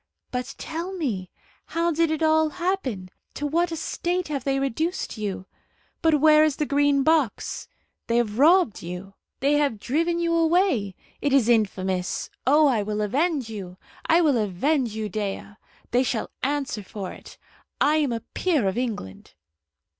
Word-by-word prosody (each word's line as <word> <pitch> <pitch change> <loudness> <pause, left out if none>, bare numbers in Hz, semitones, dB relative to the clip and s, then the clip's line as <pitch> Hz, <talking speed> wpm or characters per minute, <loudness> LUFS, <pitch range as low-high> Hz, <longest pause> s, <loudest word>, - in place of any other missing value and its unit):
But 250 +1 -4
tell 335 +4 -5
me, 225 - -3 0.4
how 335 +1 0
did 330 0 +2
it 315 0 -1
all 315 0 +4
happen? 300 - -3 0.2
To 295 - -3
what 335 +4 +1
a - - -2
state 345 +2 -2
have 280 -4 -3
they 275 -1 +1
reduced 310 +7 -2
you! 200 -4 -4 0.6
But 320 -2 +3
where 305 +1 +6
is 310 -3 +2
the 300 - -1
Green 285 -1 +2
Box? 310 -7 0 0.4
They 235 - +2
have 225 -1 0
robbed 320 - +4
you. 180 +3 -7 0.3
They 280 +2 +3
have 280 -8 0
driven 335 +9 0
you 340 0 0
away. 330 - +2 0.3
It 285 -1 +1
is 265 -5 +4
infamous. 190 -5 0 0.2
Oh, 300 +3 +6
I 240 -6 +2
will 210 +1 -3
avenge 280 - 0
you 185 -4 -7 0.3
I 330 +2 +5
will 290 -7 +3
avenge 220 - 0
you, 220 -1 -2
Dea! 205 0 -3 0.5
They 245 - +3
shall 245 -4 -2
answer 275 -5 -1
for 195 -1 -7
it. - - -13 0.4
I 300 +2 +4
am 290 -5 +1
a 230 -1 -2
peer 310 - +1
of 190 +5 -1
England." 210 - -5
275 Hz, 165 wpm, -25 LUFS, 215-315 Hz, 0.6 s, where